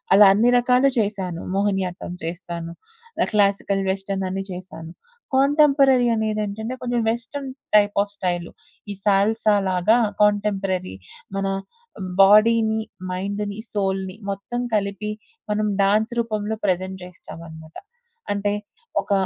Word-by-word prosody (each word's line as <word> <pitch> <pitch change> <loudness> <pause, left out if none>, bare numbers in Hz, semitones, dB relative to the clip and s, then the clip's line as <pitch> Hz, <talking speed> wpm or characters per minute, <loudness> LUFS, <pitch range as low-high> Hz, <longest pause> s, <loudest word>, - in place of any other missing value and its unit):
అలా 205 0 +9
అన్ని 235 +4 +4
రకాలు 250 +2 +3
చేశాను. 190 -5 -1
మోహినియాట్టం 190 -3 -1
చేస్తాను. 170 -1 -5 0.5
ఆహ్, - - +2
క్లాసికల్ 200 -1 +2
వెస్ట్రన్ 195 0 -3
అన్ని 195 0 -3
చేశాను. 175 -2 -9 0.4
కాంటెంపరరీ 275 -3 +4
అనేదేంటంటే, 215 +2 -2
కొంచెం 245 -1 -1
వెస్ట్రన్ 270 +4 -5 0.3
టైప్ 205 -1 +5
ఆఫ్ 205 - -2
స్టైలు 175 -2 -2 0.4
ఈ - - -3
సాల్సాలాగా 205 -1 +3 0.2
కాంటెంపరరీ 195 - +1 0.4
మన 195 0 -1 0.7
బాడీని, 220 +2 +5 0.3
మైండ్‌ని, 200 +2 -3 0.2
సోల్‌ని 190 -2 -1
మొత్తం 200 +5 -4
కలిపి 205 0 -1 0.4
మనం 210 0 0
డాన్స్ 215 +4 +2
రూపంలో 220 -2 -2
ప్రజెంట్ 185 0 -1
చేస్తామనమాట. 160 -2 -11 0.6
అంటే 205 0 -1 0.5
ఒక - - -11
200 Hz, 105 wpm, -22 LUFS, 190-220 Hz, 0.7 s, అలా